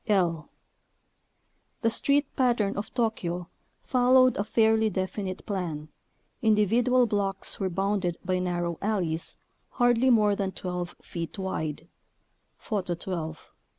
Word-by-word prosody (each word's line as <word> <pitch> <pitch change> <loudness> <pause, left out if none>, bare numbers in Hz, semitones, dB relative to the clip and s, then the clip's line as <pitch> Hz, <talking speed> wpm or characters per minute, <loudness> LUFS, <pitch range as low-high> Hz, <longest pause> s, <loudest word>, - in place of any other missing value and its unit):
I. 190 -5 +4 1.5
The 230 - +3
street 280 +5 +2
pattern 235 -6 +2
of 200 +2 -4
Tokyo 180 -8 -1 0.3
followed 255 0 +4
a 200 - 0
fairly 220 0 +3
definite 190 0 -3
plan. 165 -7 -3 0.5
Individual 230 +4 +3
blocks 200 -3 -1
were 190 - 0
bounded 195 -1 -1
by 185 0 +1
narrow 175 -2 -2
alleys, 180 -6 -1 0.4
hardly 245 +1 +3
more 210 -4 +4
than 195 -1 -2
12 180 -1 -4
feet 170 +2 -6
wide 160 -5 -3 0.4
( - - -46
Photo 190 -6 -2
12 165 -3 -6
). - - -46
195 Hz, 120 wpm, -27 LUFS, 175-225 Hz, 1.5 s, I